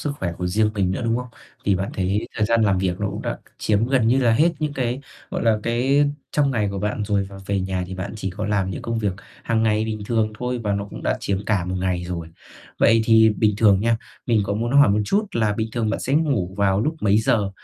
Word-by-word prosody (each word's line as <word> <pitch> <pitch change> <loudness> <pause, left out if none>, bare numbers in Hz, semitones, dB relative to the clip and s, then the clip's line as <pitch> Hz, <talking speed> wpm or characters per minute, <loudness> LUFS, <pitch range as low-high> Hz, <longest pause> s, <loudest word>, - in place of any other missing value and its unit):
sức 145 - -2
khỏe 85 -3 -2
của 90 - -2
riêng 105 +4 +2
mình 95 -3 +1
nữa, 95 - -2
đúng 115 0 +1
không? 125 0 -4 0.4
Thì 100 - +3
bạn 95 +2 -3
thấy 95 +3 -1
thời 105 -1 +1
gian 115 0 +3
làm 100 -3 +3
việc 90 -1 -1
nó - - 0
cũng - - -6
đã - - -2
c - - -22
chiếm 110 +1 +1
gần 125 -3 +2
như 130 +3 +4
là 120 -4 +3
hết 160 +9 +3
những 150 -1 -2
cái, 125 -1 -2 0.3
gọi - - -3
là, 110 -2 +3
cái, 130 +5 +2 0.3
trong 145 -2 +2
ngày 110 -5 0
của 100 - -4
bạn 105 +2 -2
rồi 100 -1 0
và 95 0 -11
về 100 -1 0
nhà 95 -1 -2
thì 95 - -7
bạn 95 +1 -5
chỉ 95 -3 -3
có 100 +4 -4
làm 100 -3 0
những 90 - -5
công 115 -1 -2
việc 105 -3 0 0.3
hằng 115 -1 0
ngày 110 -1 +2
bình 110 -1 -4
thường 110 -2 0
thôi 125 0 -2
và 105 - +1
nó 100 0 -1
cũng - - -8
đã - - 0
chiếm 100 0 -2
cả 100 -5 +1
1 90 +1 -3
ngày 90 -1 -1
rồi. 85 -2 -5 0.5
Vậy 115 0 +5
thì 110 -1 +6
bình 105 -1 +1
thường 105 -3 +4
nha, 115 +1 +2 0.3
mình 115 -3 +3
có 100 - -2
muốn 115 +4 -2
hỏi 140 -5 +6
một 105 +1 +2
chút 205 - +1
là 110 -8 +1
bình 110 +1 -2
thường 115 -3 -1
bạn - - -2
sẽ 135 - -1
ngủ 135 - +1
vào 100 -1 +2
lúc 155 +8 0
mấy 105 0 +3
giờ? 110 -4 +1
105 Hz, 270 wpm, -22 LUFS, 100-115 Hz, 0.5 s, thì